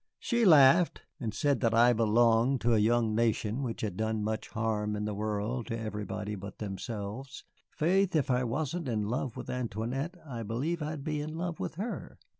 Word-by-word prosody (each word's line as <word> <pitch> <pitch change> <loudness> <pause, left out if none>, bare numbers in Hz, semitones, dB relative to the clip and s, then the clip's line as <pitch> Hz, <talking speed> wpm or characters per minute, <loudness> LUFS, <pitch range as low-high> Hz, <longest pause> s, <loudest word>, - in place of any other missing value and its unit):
"She 235 -2 +1
laughed, 155 0 +6 0.2
and 115 -6 -2
said 140 +5 +1
that 115 -2 +2
I 120 +1 +6
belonged 115 +3 +3
to 120 0 +3
a 110 - +4
young 115 0 +2
nation 115 +1 0
which 120 -4 -3
had 100 -5 -3
done 110 -1 -1
much 110 +1 -3
harm 110 -2 -1
in 105 0 -2
the 105 - -2
world 105 +3 -2
to 115 -2 -3
everybody 105 -1 -4
but 100 0 -7
themselves. 105 +5 -6 0.3
Faith, 185 +3 +1
if 145 -4 +2
I 125 0 +2
wasn't 150 +6 -2
in 110 -4 0
love 120 +3 -2
with - - -6
Antoinette, 125 - -3
I 120 -6 -6
believe 130 +10 -2
I'd 150 -1 -4
be 150 -1 -2
in 155 +2 -5
love 175 -1 -3
with - - -4
her." 210 +8 -5
115 Hz, 190 wpm, -30 LUFS, 110-140 Hz, 0.3 s, laughed